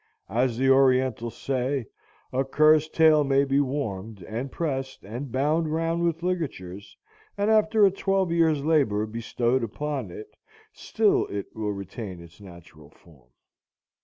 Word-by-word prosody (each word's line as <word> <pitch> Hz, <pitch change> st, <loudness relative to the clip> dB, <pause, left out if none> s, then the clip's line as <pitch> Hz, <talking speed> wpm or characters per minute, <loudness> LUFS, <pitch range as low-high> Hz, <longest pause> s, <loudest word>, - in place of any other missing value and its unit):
As 120 Hz, +2 st, 0 dB
the 135 Hz, +1 st, +1 dB
Orientals 130 Hz, -3 st, +2 dB
say, 130 Hz, -1 st, -2 dB, 0.5 s
"A 130 Hz, +1 st, +1 dB
cur's 155 Hz, +3 st, +4 dB
tail 155 Hz, -2 st, +4 dB
may 135 Hz, 0 st, +2 dB
be 135 Hz, 0 st, +1 dB
warmed, 110 Hz, -8 st, -3 dB
and 120 Hz, +8 st, -5 dB
pressed, 135 Hz, -5 st, -4 dB
and 120 Hz, +6 st, -7 dB
bound 150 Hz, +5 st, 0 dB
round 165 Hz, +1 st, -1 dB
with 170 Hz, -1 st, -1 dB
ligatures, 100 Hz, -, -4 dB, 0.4 s
and 205 Hz, +2 st, +1 dB
after 215 Hz, -1 st, +4 dB
a 195 Hz, -, +4 dB
twelve 195 Hz, -2 st, 0 dB
years' 160 Hz, -4 st, +2 dB
labor 135 Hz, -10 st, +2 dB
bestowed 115 Hz, +3 st, -1 dB
upon 135 Hz, 0 st, -4 dB
it, 105 Hz, +5 st, -11 dB, 0.4 s
still -, -, +1 dB
it 100 Hz, -1 st, -6 dB
will 105 Hz, -1 st, -2 dB
retain 100 Hz, -1 st, -7 dB
its 85 Hz, +2 st, -15 dB
natural 85 Hz, -5 st, -14 dB
form." 75 Hz, -6 st, -22 dB
130 Hz, 140 wpm, -25 LUFS, 105-155 Hz, 0.5 s, cur's